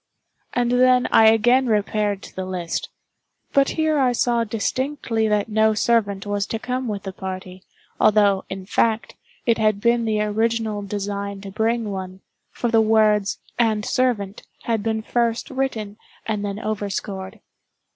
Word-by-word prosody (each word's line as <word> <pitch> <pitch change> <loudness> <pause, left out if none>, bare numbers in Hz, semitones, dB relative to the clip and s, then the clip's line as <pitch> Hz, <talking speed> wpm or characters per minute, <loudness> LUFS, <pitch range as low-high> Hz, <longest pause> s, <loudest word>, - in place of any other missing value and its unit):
And 245 -1 +1
then 250 0 +4
I 220 - +7
again 240 +4 +4
repaired 210 -2 0
to - - -12
the 185 - -3
list—but 185 +9 -3
here 315 -2 +1
I 255 -2 +3
saw 235 -1 +1
distinctly 230 +1 -1
that 210 -1 +1
no 220 0 +2
servant 205 -3 +1
was 205 0 -1
to 225 - -2
come 250 +2 -3
with 205 -3 -4
the 195 -1 -6
party, 185 -1 -7 0.4
although, 205 -2 +4
in 190 0 -6
fact, 220 +3 0 0.3
it 230 -2 +2
had 215 -2 +2
been 235 +1 +2
the 215 -1 0
original 220 0 0
design 200 0 -4
to 195 -1 -8
bring 220 +1 0
one—for 190 +5 -6
the 225 -1 +5
words 215 -2 +3 0.2
"and 215 -3 +2
servant" 220 -6 0 0.2
had 225 -2 0
been 220 0 -2
first 235 +1 -1
written 225 -6 -3 0.3
and 210 -2 -2
then 200 0 -3
overscored. 200 -1 -4
215 Hz, 145 wpm, -22 LUFS, 200-235 Hz, 0.4 s, I